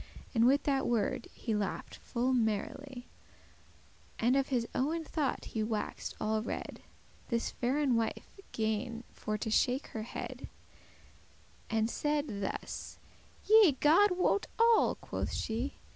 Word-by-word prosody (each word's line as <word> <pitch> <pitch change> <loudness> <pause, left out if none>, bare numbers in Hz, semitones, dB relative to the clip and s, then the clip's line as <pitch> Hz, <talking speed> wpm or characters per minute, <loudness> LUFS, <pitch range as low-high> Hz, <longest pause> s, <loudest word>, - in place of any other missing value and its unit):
And 230 -1 +5
with 275 +2 +4
that 275 -2 +1
word 235 0 0
he 225 - -3
laugh'd 210 -2 -2
full 250 +2 -1
merrily, 245 +3 -2 1.1
And 240 +3 +3
of 275 -1 +2
his 240 -4 0
owen 320 +5 0
thought 300 -3 -2
he 220 - 0
wax'd 215 -1 -3
all 215 0 0
red. 230 - -5 0.5
This 235 -1 -1
faire 270 +5 0
wife 230 -3 0 0.2
gan 225 +2 -2
for 215 0 -3
to 220 +1 -3
shake 255 +4 +2
her 220 - -5
head, 245 +3 -6 1.2
And 220 0 +2
saide 290 -5 -1
thus; 195 - -5 0.5
"Yea, 430 -7 +7
God 360 +5 +5
wot 400 +2 +2
all" 460 0 +5
quoth - - -4
she. 235 +5 -2
245 Hz, 130 wpm, -32 LUFS, 225-285 Hz, 1.2 s, Yea